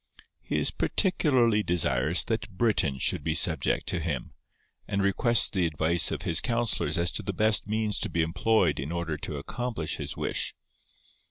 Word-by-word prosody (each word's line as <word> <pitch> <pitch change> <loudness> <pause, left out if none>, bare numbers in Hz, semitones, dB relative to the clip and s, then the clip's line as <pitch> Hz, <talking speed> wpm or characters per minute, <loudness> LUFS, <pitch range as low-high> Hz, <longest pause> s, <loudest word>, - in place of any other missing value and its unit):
He - - -3
is - - +2
particularly 130 - +2
desirous 85 -4 +1
that 110 -1 -3
Britain 95 - 0
should 70 - -1
be 80 0 -1
subject 80 -5 +1
to 90 - -1
him, 75 -6 -4 0.5
and 100 - -2
requests 115 +4 +3
the 90 -4 0
advice 80 +2 +3
of - - -4
his 85 - +3
counsellors 120 -6 -1
as 85 +1 +1
to - - -1
the 100 -1 -4
best 110 +2 +2
means 110 -1 -1
to - - -2
be 85 - 0
employed 90 +6 +1
in 70 +4 -4
order 85 -2 -3
to 75 0 -6
accomplish 110 - -4
his - - -6
wish. - - -2
90 Hz, 170 wpm, -27 LUFS, 80-110 Hz, 0.5 s, requests